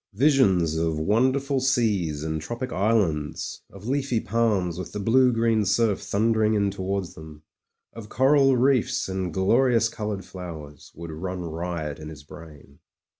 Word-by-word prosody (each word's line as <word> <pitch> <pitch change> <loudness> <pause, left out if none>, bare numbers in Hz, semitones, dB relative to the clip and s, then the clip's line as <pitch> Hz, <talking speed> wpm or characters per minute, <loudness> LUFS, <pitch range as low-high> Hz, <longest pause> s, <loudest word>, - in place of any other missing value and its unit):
Visions 100 - +3
of 80 -1 0
wonderful 130 - +1
seas 105 - 0
and 80 -1 -3
tropic 120 +8 -5
islands, 95 -8 -1
of 100 +2 -12
leafy 135 -3 0
palms 105 -7 0
with 95 - -7
the 105 - -4
blue 125 +5 +4
green 115 -2 +1
surf 105 +1 +1
thundering 110 +2 +1
in 100 -1 +1
towards 95 -1 -3
them, 80 -1 -12 0.5
of 110 -2 -10
coral 135 0 +4
reefs 130 -1 +1
and 95 -2 -3
glorious 115 +5 +2
coloured 105 -5 -5
flowers, 80 -6 -10
would 85 0 -8
run 90 +3 -5
riot 80 -3 -4
in 75 0 -8
his 75 -2 -11
brain. 75 -3 -14
100 Hz, 145 wpm, -25 LUFS, 85-115 Hz, 0.5 s, blue